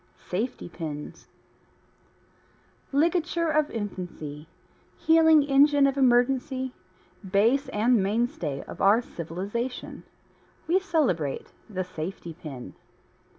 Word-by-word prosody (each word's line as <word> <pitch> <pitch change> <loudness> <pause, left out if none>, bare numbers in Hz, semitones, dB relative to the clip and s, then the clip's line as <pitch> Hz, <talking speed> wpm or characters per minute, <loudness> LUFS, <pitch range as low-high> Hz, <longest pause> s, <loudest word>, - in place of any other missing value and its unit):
SAFETY 220 +5 -3
PINS 155 -4 -7 1.6
Ligature 335 +3 +1
of 305 0 +2
infancy, 175 -8 -6 0.5
healing 320 -2 +5
engine 285 0 +5
of 275 -1 +2
emergency, 260 0 +2 0.6
base 230 +9 +3
and 225 +1 +3
mainstay 195 - -1
of - - -9
our 200 +4 +6
civilization 200 +10 -5 0.6
we 350 +4 +3
celebrate 265 - -1 0.2
the 185 -3 -2
safety 170 0 -6
pin. 145 -7 -9
235 Hz, 90 wpm, -26 LUFS, 180-280 Hz, 1.6 s, our